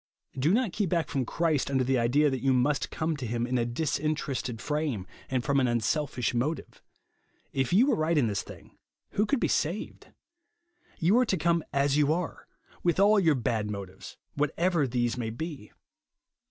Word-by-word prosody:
Do 140 +5 +1
not 225 -3 +1
keep 205 -2 0
back 170 -2 0
from 130 -4 -1
Christ 160 -5 0
under 135 -2 +1
the 130 0 +1
idea 140 +5 +3
that 130 - -2
you 135 -1 +3
must 130 +3 +1
come 160 0 -2
to 130 -3 -5
him 120 +1 -1
in 125 0 0
a 120 - +1
dis 140 +6 -1
interested 140 -6 -2
frame, 150 -10 -2 0.2
and 130 -2 0
from 140 +1 +2
an 130 - +2
unselfish 120 +1 0
motive. 135 +7 -3 0.7
If 135 -2 0
you 210 +8 +5
were 285 - +2
right 160 +1 +1
in 140 - +4
this 100 -3 -1
thing, - - -14 0.3
who 210 +1 +1
could 280 +1 +1
be - - +1
saved? 170 +7 -2 0.9
You 190 +7 +3
are 255 - +4
to 190 - 0
come 170 0 +1
as 140 0 +2
you 150 0 +3
are 170 - 0 0.2
r, - - -20 0.3
with 175 0 +1
all 205 +1 +6
your 165 -6 +3
bad 115 -4 -1
motives, 95 -2 -8 0.2
what 150 0 +1
ever 170 -5 +2
these 120 -1 -1
may 115 -2 -2
be. 135 -1 -6
145 Hz, 195 wpm, -28 LUFS, 125-165 Hz, 0.9 s, all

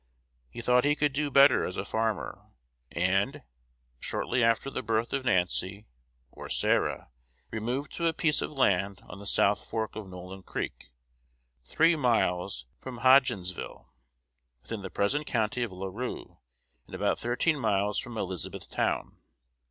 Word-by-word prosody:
He 90 - -7
thought 125 +1 +4
he 145 +1 +3
could 145 -1 +1
do 145 +1 0
better 140 -2 +6
as 90 - -4
a 95 - -2
farmer; 110 -1 -2 0.4
and, 95 - +1 0.6
shortly 125 - -1
after 115 +4 +2
the - - -3
birth 110 +1 -1
of 135 -1 0
Nancy 95 0 0 0.5
(or - - -9
Sarah), - - +1 0.4
removed 120 +6 -3
to 170 - -1
a - - +4
piece 160 -2 +1
of - - -3
land 100 -8 +1
on 90 - -10
the 100 - -8
south 100 +1 +3
fork 110 -1 -3
of 110 -3 -6
Nolin 90 +1 -9
Creek, - - -5 0.8
three 165 - +4
miles 95 - +1
from 125 -3 -8
Hodgensville, 100 - +2 0.7
within 115 -3 -5
the 95 - -6
present 145 +9 0
county 110 +1 0
of 120 -4 -1
La 95 +1 -6
Rue, 110 +7 -6 0.5
and - - -8
about - - 0
thirteen 135 +6 +1
miles 105 -3 +1
from 120 -2 -6
Elizabethtown. 95 -6 -2
110 Hz, 145 wpm, -29 LUFS, 95-130 Hz, 0.8 s, better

